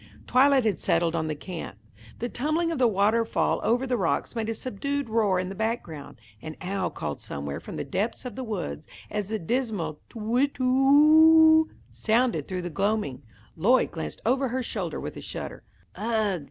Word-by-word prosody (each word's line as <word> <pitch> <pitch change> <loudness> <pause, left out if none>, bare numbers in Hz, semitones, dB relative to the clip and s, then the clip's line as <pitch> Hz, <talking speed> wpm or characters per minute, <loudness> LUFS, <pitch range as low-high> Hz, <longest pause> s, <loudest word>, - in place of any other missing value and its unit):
Twilight 265 -1 +4
had 210 -5 +1
settled 165 0 +1
on 160 -1 -1
the 155 - -2
camp. 165 - -7 0.4
The 240 - -3
tumbling 310 +7 -1
of 320 - -3
the 250 - +5
waterfall 220 +2 +1
over 245 +3 +1
the 250 -2 0
rocks 185 +4 -1
made 225 -1 -2
a 225 - -2
subdued 280 +4 -3
roar 210 -4 +2
in 185 0 -3
the - - -5
background. 205 -8 -4 0.2
An 155 -1 -7
owl 190 0 -2
called - - -5
somewhere 70 0 -5
from - - -9
the - - -3
depths 220 +6 -3
of 245 -4 -6
the 260 - -4
woods. 180 - -5 0.2
As 205 -2 -3
the 220 - -1
dismal 205 - -2
"Tu - - -12
whit, 245 +6 0
tu 255 - -3
who 315 +4 +6
oo" - - -25 0.2
sounded 235 +3 +1
through 185 -2 -4
the 175 - -4
gloaming, 195 -7 -1 0.3
Lloyd - - +3
glanced 75 -1 -6
over 260 +3 +2
her 255 +1 -2
shoulder - - -4
with - - -6
a - - -7
shudder. - - -7 0.3
"Ugh!" 215 -4 0
225 Hz, 190 wpm, -26 LUFS, 185-260 Hz, 0.4 s, who